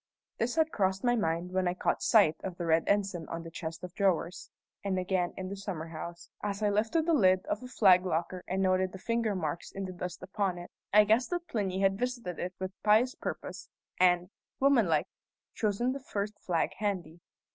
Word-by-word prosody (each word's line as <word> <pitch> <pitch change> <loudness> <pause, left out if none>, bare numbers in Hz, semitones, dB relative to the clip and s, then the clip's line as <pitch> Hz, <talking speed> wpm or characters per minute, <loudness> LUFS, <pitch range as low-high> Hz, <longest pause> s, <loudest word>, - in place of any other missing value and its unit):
This 240 +4 0
had 320 -1 +2
crossed 190 -1 0
my 245 -1 +3
mind 170 -4 -1
when 185 -1 +1
I 175 - 0
caught - - 0
sight 200 -9 +5
of 185 -2 -5
the 175 - -3
red 160 0 +3
ensign 195 -5 0
on 165 0 -4
the 165 - -9
chest 165 +1 -6
of 180 -1 -7
drawers; 190 -3 0 0.3
and 195 -2 0
again 185 -1 0
in 185 - -4
the 195 - -5
summer 185 -5 -5
house, 170 +1 -7
as 205 0 -3
I 205 - +3
lifted 220 +10 +1
the 335 - +2
lid 185 -8 +4
of - - -2
the 250 - -9
flag 190 -7 +5
locker 180 0 -2
and 190 +1 0
noted 185 0 +2
the - - -6
finger 230 +1 0
marks 165 -2 -3
in 195 0 -4
the 185 - -6
dust 180 0 -6
upon 190 -1 -1
it, 175 0 -9 0.2
I 210 +1 +8
guessed 220 +4 +3
that 350 -1 -3
Plinny 195 -6 -1
had 195 0 +2
visited 245 -8 -3
it 180 +1 -4
with 190 0 -4
pious 220 +5 +4
purpose, - - -6 0.3
and, 180 0 +4 0.3
woman 265 -7 +4
like, 155 -2 +2 0.5
chosen 220 +3 0
the 275 - -5
first 210 -5 -3
flag 170 -3 0
handy. 180 -6 -2
190 Hz, 210 wpm, -30 LUFS, 180-210 Hz, 0.5 s, I